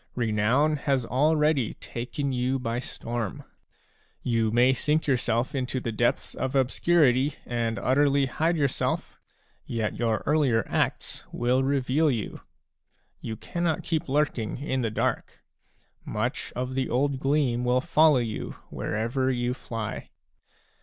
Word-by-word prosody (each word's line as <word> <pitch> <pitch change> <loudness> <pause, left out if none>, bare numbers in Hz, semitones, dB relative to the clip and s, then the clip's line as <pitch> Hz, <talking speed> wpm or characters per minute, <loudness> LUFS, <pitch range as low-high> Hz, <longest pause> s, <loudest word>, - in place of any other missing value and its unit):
Renown 120 +6 +2
has 135 -3 0
already 150 0 +2
taken 135 +4 -4
you 125 +1 0
by 120 -1 -2
storm. 120 -4 -4 0.8
You 115 -2 +1
may 120 +4 +4
sink 150 +5 +1
yourself 125 0 0
into 130 -1 -1
the 120 - -3
depths 120 +2 0
of 130 +1 -3
obscurity 135 0 +3
and 115 -2 -1
utterly 140 +5 +3
hide 160 +6 0
yourself; 140 -4 -1 0.4
yet 115 -2 -3
your 115 -2 0
earlier 140 -7 +2
acts - - -1
will 125 +2 +1
reveal 140 +3 +2
you. 115 -6 -3 0.8
You 110 - -5
cannot 170 - -2
keep 165 -2 -2
lurking 140 -6 0
in 130 -1 -2
the 115 - 0
dark; 110 - -2 0.6
much 120 +5 -3
of 125 +1 -3
the 130 -1 -1
old 135 +2 +1
gleam 135 -4 +1
will 125 +1 +3
follow 155 0 +4
you 115 -3 -3 0.2
wherever 120 +5 -1
you 120 -1 0
fly. 115 -4 -5
130 Hz, 130 wpm, -27 LUFS, 120-145 Hz, 0.8 s, may